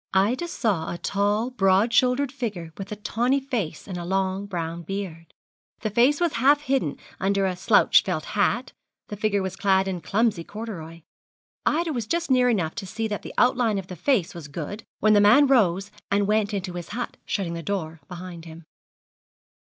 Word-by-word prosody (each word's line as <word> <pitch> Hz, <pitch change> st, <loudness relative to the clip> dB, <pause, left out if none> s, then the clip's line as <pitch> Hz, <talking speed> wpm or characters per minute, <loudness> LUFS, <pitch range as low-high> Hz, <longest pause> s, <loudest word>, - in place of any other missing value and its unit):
Ida 230 Hz, -, +2 dB
saw 205 Hz, -, -1 dB
a 175 Hz, -, -4 dB
tall, 205 Hz, +6 st, 0 dB
broad 200 Hz, 0 st, +3 dB
shouldered 255 Hz, +1 st, +3 dB
figure 200 Hz, -, -5 dB
with 195 Hz, +1 st, -8 dB
a -, -, -2 dB
tawny 240 Hz, +6 st, 0 dB
face 235 Hz, -, -4 dB
and 185 Hz, -3 st, -5 dB
a -, -, -5 dB
long 190 Hz, +2 st, -1 dB
brown 170 Hz, -3 st, -4 dB
beard. 170 Hz, -2 st, -6 dB, 0.5 s
The 215 Hz, -, -2 dB
face 250 Hz, +7 st, +4 dB
was 345 Hz, -3 st, +1 dB
half 285 Hz, +3 st, +5 dB
hidden 265 Hz, -, 0 dB, 0.2 s
under 195 Hz, 0 st, +1 dB
a 185 Hz, -1 st, 0 dB
slouched 180 Hz, -, +5 dB
felt -, -, -1 dB
hat, -, -, +1 dB, 0.4 s
the 210 Hz, -, -4 dB
figure 205 Hz, -1 st, 0 dB
was 190 Hz, 0 st, -4 dB
clad 195 Hz, -1 st, +2 dB
in 180 Hz, -2 st, -3 dB
clumsy 205 Hz, -1 st, +1 dB
corduroy. 170 Hz, -6 st, -8 dB, 0.6 s
Ida 325 Hz, +1 st, +1 dB
was 235 Hz, -4 st, -3 dB
just 340 Hz, 0 st, -1 dB
near 250 Hz, -1 st, +4 dB
enough 175 Hz, -9 st, 0 dB
to 200 Hz, -4 st, -5 dB
see 225 Hz, +3 st, -3 dB
that 205 Hz, -, -3 dB
the -, -, -9 dB
outline 245 Hz, -4 st, +3 dB
of 195 Hz, -, -4 dB
the 180 Hz, -, -6 dB
face 200 Hz, -, +1 dB
was 170 Hz, -4 st, -8 dB
good, 165 Hz, +8 st, -6 dB, 0.2 s
when 215 Hz, 0 st, +5 dB
the 205 Hz, -, +6 dB
man 210 Hz, +8 st, +7 dB
rose 200 Hz, -7 st, +2 dB, 0.2 s
and 200 Hz, 0 st, +2 dB
went 210 Hz, 0 st, +1 dB
into 190 Hz, -3 st, -3 dB
his 175 Hz, -1 st, -6 dB
hut, 240 Hz, +3 st, -5 dB
shutting 185 Hz, -5 st, -2 dB
the 170 Hz, -, -4 dB
door 165 Hz, -4 st, -4 dB
behind 180 Hz, -2 st, -8 dB
him. 165 Hz, 0 st, -11 dB
200 Hz, 190 wpm, -25 LUFS, 180-235 Hz, 0.6 s, man